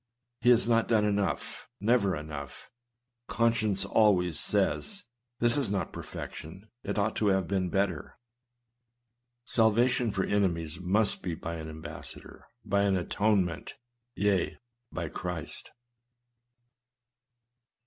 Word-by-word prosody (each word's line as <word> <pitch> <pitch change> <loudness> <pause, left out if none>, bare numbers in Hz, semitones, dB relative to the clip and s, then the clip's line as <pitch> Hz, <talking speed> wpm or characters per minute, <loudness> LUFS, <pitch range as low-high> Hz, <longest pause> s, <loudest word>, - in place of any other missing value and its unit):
He 120 - +3
has 120 -2 +5
not 115 -1 +3
done 110 -2 +3
enough 100 -1 -1
— - - -56
"never 105 -2 +2
enough;" 75 -2 -8 0.6
conscience 115 -4 +1
always 95 -6 +3
says, 180 - 0 0.4
"this 120 +3 +4
is 135 -7 0
not 95 -4 -2
perfection; 95 +7 -8
it - - -3
ought 105 +1 +1
to 105 - +1
have 95 -3 +2
been 95 -2 0
better." 95 -4 -1 1.3
Salvation 120 +2 +3
for 100 -2 -1
enemies 85 -5 0
must 100 +4 +2
be 85 -3 -3
by 85 +1 -5
an 80 0 -6
ambassador, 80 0 -9
— 120 -2 -42
by 100 -1 +2
an 100 -1 +2
atone 100 +2 +2
ment, 85 -1 -6 0.2
— 120 +1 -53
yea, 95 -7 +1 0.3
by 85 -2 -3
Christ. 85 0 -6
100 Hz, 130 wpm, -29 LUFS, 90-110 Hz, 1.3 s, has